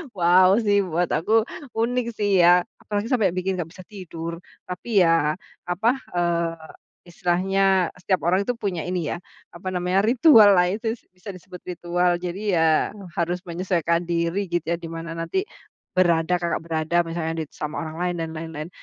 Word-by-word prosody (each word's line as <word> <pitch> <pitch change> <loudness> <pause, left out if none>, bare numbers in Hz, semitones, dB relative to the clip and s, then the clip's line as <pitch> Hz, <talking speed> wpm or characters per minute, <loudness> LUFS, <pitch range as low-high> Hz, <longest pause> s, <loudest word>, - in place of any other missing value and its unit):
wow 185 +2 +5
sih, 205 -1 +3
buat 175 +1 -1
aku 220 +6 +2 0.3
unik 240 +2 0
sih 200 -3 +2
ya 175 +1 +6 0.2
apalagi 205 +1 -3
sampai 200 -8 +2
bikin 185 0 -1
nggak 165 - -3
bisa 185 - -12
tidur. 170 -4 -7 0.2
Tapi 185 +2 +1
ya, 165 -2 +3 0.3
apa, 185 +7 +1 0.3
eee, 170 -1 0 0.5
istilahnya 185 +1 +1
setiap 185 +1 0
orang 190 +2 +2
itu 245 - 0
punya 195 -8 -3
ini 180 -4 -2
ya, - - -2 0.3
apa 185 +2 -6
namanya, 180 +3 +1
ritual 230 -4 +7
lah 180 -1 +4
itu 225 +4 -3
bisa 185 +2 -10
disebut 185 0 -11
ritual 175 0 0
jadi 180 +2 -4 0.2
ya 160 - +4 0.5
harus 175 +1 -1
menyesuaikan 175 -1 -1
diri 170 +3 -1
gitu 175 -2 -2
ya 170 - +1
di 170 - -10
mana 165 0 -6
nanti 165 - -1 0.6
berada, 175 -1 +3
Kakak 170 -2 -2
berada 165 +1 0
misalnya 165 -1 -3
di 155 - -4
sama 150 +2 -5
orang 160 0 -6
lain 175 0 -1
dan 165 - -3
lain-lain, 160 0 -6
180 Hz, 165 wpm, -23 LUFS, 170-195 Hz, 0.6 s, ritual